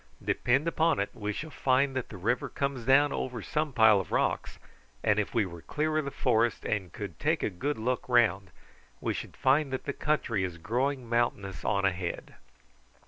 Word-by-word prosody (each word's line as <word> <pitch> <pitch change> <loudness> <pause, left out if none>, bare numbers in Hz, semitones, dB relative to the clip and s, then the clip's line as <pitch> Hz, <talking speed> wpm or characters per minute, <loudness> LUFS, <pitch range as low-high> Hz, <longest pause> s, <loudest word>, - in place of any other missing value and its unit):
Depend 135 +6 +1
upon 165 -3 +2
it 100 - -1
we 105 -1 -3
shall 155 +9 -6
find 135 0 +2
that 130 - -3
the 105 - -8
river 115 +7 0
comes 140 -4 -3
down 140 +2 +5
over 120 -5 -4
some 150 -1 -1
pile 110 -4 +6
of 95 - -6
rocks, - - 0 0.5
and 105 -1 +3
if 105 - -2
we 110 -3 +3
were 85 -2 -9
clear 155 - -1
of 155 - -2
the - - -2
forest 120 -4 +1
and 95 -5 -2
could - - -7
take - - +1
a - - 0
good 140 +12 -2
look 125 +3 -2
round 105 -6 +3 0.5
we - - -1
should - - -7
find 140 +1 +3
that 130 - -3
the 140 - -2
country 125 -11 0
is 90 -2 -4
growing 125 +7 -1
mountainous 100 -7 -1
on 100 -1 +1
ahead." 90 -2 -2
120 Hz, 195 wpm, -29 LUFS, 100-140 Hz, 0.5 s, pile